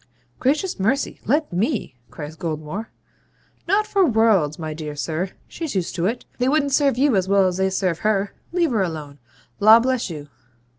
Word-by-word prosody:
'Gracious 295 - 0
mercy! 230 +9 0
let 295 - +1
ME,' 210 - -1
cries 150 0 -8
Goldmore. 160 +6 -4 0.8
'Not 405 +4 +3
for 400 -2 +2
worlds, 220 - +3
my 155 -2 -4
dear 150 -1 -6
sir. 160 +6 -2 0.2
She's 320 -9 -5
used 185 -3 -1
to 175 0 0
it. 235 +3 -3
They 250 +1 +2
wouldn't 285 -1 +1
serve 275 -3 +3
you 270 -2 +3
as 190 -1 +1
well 200 -1 +4
as 180 -1 0
they 190 0 +2
serve 185 -3 -1
her. 205 -2 0 0.2
Leave 340 -4 +1
her 220 -4 +1
alone. 155 -5 -4 0.4
Law 220 +3 +8
bless 255 -2 0
you!' 150 -3 -7
200 Hz, 180 wpm, -22 LUFS, 165-265 Hz, 0.8 s, Law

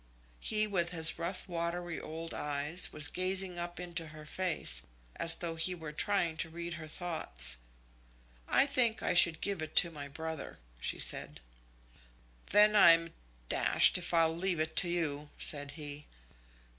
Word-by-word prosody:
He, 215 0 0
with 180 -5 -2
his 160 -2 +1
rough 180 +3 -5
watery 175 0 -4
old 165 +1 -8
eyes, 150 +4 0
was 150 0 +4
gazing 185 0 -1
up 175 0 -6
into 170 -2 -4
her 155 0 -12
face, 155 - 0 0.4
as 165 -1 +2
though 170 -1 -5
he 165 +3 -1
were 160 -3 -9
trying 175 -1 -1
to 165 - -4
read 170 +1 -7
her 155 -2 -9
thoughts. 70 - -1 0.9
"I - - +3
think 255 -6 +1
I - - +1
should 170 -2 +5
give 200 -4 -2
it 155 0 -7
to 170 - +4
my 145 -3 -8
brother," 160 +2 -7 0.2
she - - -1
said. - - +3 1.1
"Then 210 +1 +5
I'm 165 -4 +5 0.4
d - - +1
if 180 -1 +5
I'll 165 -1 +2
leave 175 -1 -1
it 155 0 -3
to 175 - +5
you," 150 -4 -2
said 145 -2 +2
he. 150 -1 -9
170 Hz, 155 wpm, -31 LUFS, 155-180 Hz, 1.1 s, should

